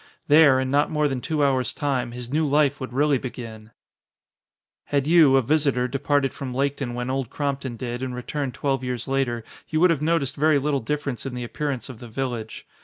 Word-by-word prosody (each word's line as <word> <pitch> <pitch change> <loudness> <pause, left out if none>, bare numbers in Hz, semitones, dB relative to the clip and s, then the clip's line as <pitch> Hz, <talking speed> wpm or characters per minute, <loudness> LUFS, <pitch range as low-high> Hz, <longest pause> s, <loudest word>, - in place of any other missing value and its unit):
There, 145 -3 +6
in 130 0 -1
not 145 +1 +3
more 150 -1 +1
than 135 -3 -3
two 155 +1 0
hours 130 -2 0
time, 130 -5 -1
his 125 +1 -7
new 155 0 +2
life 145 -1 +2
would 130 - -5
really 140 +1 +2
begin! 115 -4 -8 1.2
Had 140 -2 0
you, 155 -4 +6
a 135 - +4
visitor, 140 -2 +2
departed 140 +1 0
from 130 -3 -6
Laketon 135 -2 -1
when 125 +1 -3
Old 135 -3 -2
Crompton 140 -4 -3
did 120 +1 -4
and 130 -1 -3
returned 130 +1 -4
twelve 135 -2 -1
years 125 -2 -3
later, 130 -4 -1 0.3
you 155 - 0
would 180 +1 +5
have 155 -4 0
noticed 155 -4 +1
very 155 +1 +4
little 140 0 0
difference 140 +1 -3
in 130 - -5
the 125 - -4
appearance 135 +1 -3
of 130 -5 -10
the 120 - -9
village. 115 -2 -4
135 Hz, 200 wpm, -24 LUFS, 125-145 Hz, 1.2 s, There